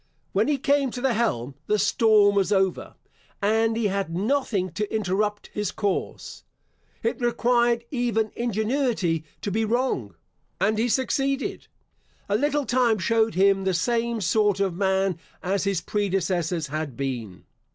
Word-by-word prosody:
When 205 +5 +2
he 295 -1 +2
came 280 0 +2
to 245 - -6
the 265 -2 +2
helm, 140 - -1
the 210 - +2
storm 210 0 +4
was 200 -1 +1
over, 190 -2 0 0.4
and 225 +2 +2
he 230 - 0
had 195 -2 -1
nothing 210 -4 0
to 210 +5 -3
interrupt 210 0 -1
his 210 -1 -1
course. 205 -2 -3 0.6
It 460 - -1
required 240 0 +2
even 235 -5 0
ingenuity 220 - 0 0.2
to 205 - -2
be 220 +3 0
wrong, 220 - -1 0.4
and 215 +2 +1
he 240 +2 +1
succeeded. 270 +2 -1 0.6
A 200 - +1
little 290 +4 +1
time 245 -3 +2
showed 225 +3 +1
him 195 +1 +3
the 190 -1 +1
same 235 +4 0
sort 205 +2 +2
of 195 -3 +1
man 190 -1 +1 0.2
as 195 +2 0
his 195 -4 0
predecessors 180 -4 -1
had 150 -4 -4
been. 120 -9 -4
210 Hz, 145 wpm, -25 LUFS, 190-235 Hz, 0.6 s, storm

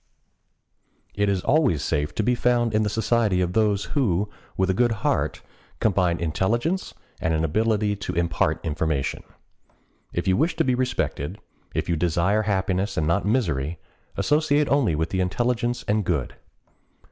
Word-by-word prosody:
It 100 0 +1
is 95 -2 0
always 135 - +2
safe 75 0 -1
to 110 - 0
be 125 +4 +2
found 120 -1 +1
in 110 - +3
the 105 - +1
society 110 -2 +1
of 90 -1 0
those 105 -2 +2
who, 105 - +1 0.3
with 95 0 +2
a - - +1
good 120 +5 +2
heart, - - 0 0.4
combine 90 -5 +2
intelligence 115 - -1 0.2
and 80 0 0
an 80 - 0
ability 105 +4 +1
to 100 - -5
impart 85 0 +1
information. 75 -3 -1 0.9
If - - -3
you 95 - +4
wish 160 - +1
to - - +2
be 130 - +1
respected, 125 - -2 0.4
if - - -1
you 85 - +1
desire 90 +5 +1
happiness 95 -1 -1
and 80 - +1
not 85 +5 +1
misery, 85 - 0 0.4
associate 150 -1 +2
only 135 - +2
with 80 +2 -2
the 95 - 0
intelligent 120 +5 0
and 105 +1 +1
good. 80 -8 -2
100 Hz, 160 wpm, -24 LUFS, 85-120 Hz, 0.9 s, you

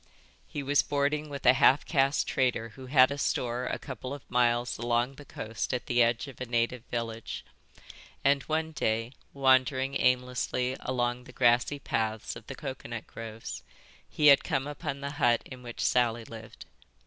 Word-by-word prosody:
He 145 - -5
was 145 +1 +3
boarding 145 +1 -1
with 140 -1 -7
a 125 - +8
half 135 +1 +4
caste 140 -2 +2
trader 125 -3 0
who 130 +3 -11
had 130 0 +6
a 140 - -4
store 125 -1 -1
a - - -2
couple 130 0 -6
of 140 - -14
miles 120 0 +2
along 120 +2 +1
the 145 +1 -13
coast 115 +1 -4
at 125 - -4
the 120 0 +2
edge 120 +2 +2
of 135 -2 -12
a 130 - -3
native 120 0 0
village; 115 -2 -4 0.8
and 140 0 +4
one 160 +1 0
day, 115 -5 -1 0.2
wandering 130 0 +2
aimlessly 125 0 +1
along 125 -1 -2
the - - -12
grassy 125 +3 +3
paths 110 -5 -2
of 115 -1 -11
the 135 - -6
coconut 130 -5 -6
groves, 115 -1 -7 0.5
he 150 - -1
had 140 -2 +8
come 135 -5 -1
upon 145 -1 -5
the 140 0 -4
hut 120 -3 +4
in 130 -1 -10
which 120 -1 -7
Sally 120 -2 +2
lived. 110 -1 -11
125 Hz, 170 wpm, -29 LUFS, 120-140 Hz, 0.8 s, a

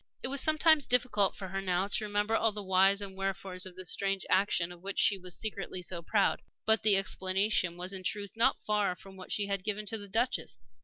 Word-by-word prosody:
It - - +1
was 275 0 +1
sometimes 310 -1 +4
difficult 230 -5 +2
for 190 -2 -7
her 195 +1 -3
now 185 0 0
to 205 - +1
remember 210 +1 0
all 225 0 +2
the 210 0 -7
whys 195 +1 +3
and 195 -1 -6
wherefores 190 -1 -4
of 180 - -12
this 185 -1 -1
strange 195 -1 0
action 185 -3 +2
of 175 -1 -13
which 200 +1 -6
she 200 - +4
was 180 -1 -5
secretly 200 -4 -4
so 170 -1 -4
proud. 200 +4 +1 0.2
But 220 0 +3
the 210 -2 +6
explanation 190 -2 +1
was 180 +2 -4
in 190 - -5
truth 200 +1 -3
not 235 +4 +1
far 210 -3 0
from 195 +1 -14
that 185 - -10
she 205 - +1
had 200 -2 -2
given 210 +1 -3
to 220 +2 -3
the 205 - -10
Duchess. 230 - -1
195 Hz, 225 wpm, -30 LUFS, 185-210 Hz, 0.2 s, the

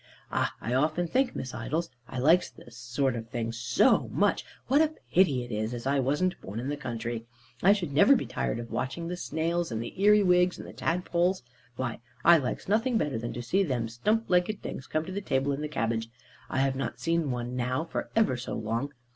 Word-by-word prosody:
Ah, - - 0
I 120 - -3
often 155 +6 +2
think, 255 +8 +1
Miss 130 -1 -5
Idols, 165 +1 -2 0.2
I 130 - -7
likes 160 +8 +4
this 120 - -15
sort 125 +2 -1
of 115 -1 -6
thing 115 -2 -2
so 120 +2 +3
much, - - +1 0.2
what 280 +4 +4
a 315 0 +1 0.2
pity 145 -9 +4
it 120 - -10
is 110 +2 -2
as 120 - -7
I 140 +1 +2
wasn't 150 +8 0
born 100 +4 -6
in 130 +3 -3
the 145 - -1
country. 120 -4 -4 0.3
I 195 +3 +7
should 175 -8 -3
never 265 - +7
be - - -1
tired - - -2
of 115 0 -7
watching 165 +6 -3
the 180 - -2
snails, 170 -2 -1
and 110 - -2
the 115 - -5
earywigs, 185 -3 +5
and - - -8
the - - -10
tadpoles. 180 0 0 0.3
Why, 120 -1 -3 0.3
I 170 0 +9
likes 130 - -4
nothing 225 +4 +2
better 145 - -1
than 120 +1 -4
to 120 - -5
see 185 +11 +2
them 130 -10 0
stump 210 - 0
legged 180 +4 +1
things 130 - -6
come 155 0 -1
to 185 +3 -4
table 135 -6 0
in 140 +1 -2
the 150 - -2
cabbage. 115 -5 -1 0.4
I 130 - 0
have 135 -1 +1
not 135 - -3
seen 165 -3 0
one 125 0 -3
now 125 +3 0
for 165 - -4
ever 220 - +3
so 120 - -5
long. 115 +6 -2
140 Hz, 215 wpm, -28 LUFS, 120-180 Hz, 0.4 s, I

